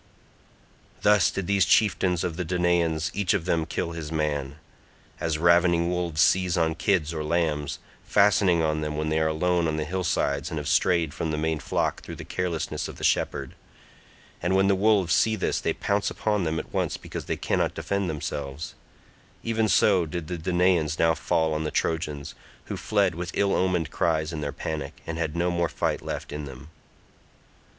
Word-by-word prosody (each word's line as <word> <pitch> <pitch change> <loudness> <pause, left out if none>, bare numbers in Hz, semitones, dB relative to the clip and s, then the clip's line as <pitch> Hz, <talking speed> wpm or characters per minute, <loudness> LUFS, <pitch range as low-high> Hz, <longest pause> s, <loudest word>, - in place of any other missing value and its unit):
Thus 105 -2 +5
did 100 - -3
these 100 0 +3
chieftains 90 -3 +2
of 85 -3 -2
the 90 - -2
Danaans 85 -2 +1
each 100 +1 +1
of 90 -5 -2
them 80 -3 0
kill 85 - -2
his 80 -2 -6
man. 75 -3 -1 0.6
As 80 -2 -1
ravening 85 +1 +4
wolves 85 -3 0
seize 90 -1 +3
on 80 -1 +2
kids 85 -2 0
or 80 -1 -3
lambs, 75 -3 0 0.3
fastening 100 -4 +3
on 75 0 0
them 75 -1 -3
when 75 0 -1
they 80 0 +1
are 80 - +2
alone 85 +2 +1
on 80 -1 -1
the 75 - -1
hillsides 75 -5 -1
and 80 - -4
have 75 -1 -4
strayed 85 -5 +2
from 80 - -3
the 75 - -1
main 80 0 -1
flock - - -1
through - - -8
the - - -9
carelessness 90 -3 -2
of - - -8
the - - -9
shepherd—and 70 +6 -3
when 95 0 +4
the 100 - +4
wolves 100 -3 +3
see 110 -1 +3
this - - -1
they - - 0
pounce 100 0 0
upon 105 -4 -1
them 80 0 -1
at - - -6
once - - -1
because - - -7
they - - -2
cannot - - 0
defend 100 -2 -1
themselves—even 80 +9 -5
so 95 -5 +4
did 85 +1 -4
the 90 +2 -4
Danaans 90 -2 +2
now 80 0 +4
fall 80 -1 0
on 75 0 -1
the 75 - -1
Trojans, 75 -4 -2 0.3
who - - -4
fled 100 -4 +1
with 85 +2 -5
ill 100 -1 +2
omened 90 -4 +1
cries 80 -1 0
in 75 - -4
their 70 -1 -2
panic 75 -2 -5
and 80 0 -4
had 80 -1 -2
no 85 +1 +1
more 85 -1 0
fight - - -1
left - - -5
in 75 0 -5
them. 70 +3 -11
85 Hz, 185 wpm, -26 LUFS, 80-90 Hz, 0.6 s, Thus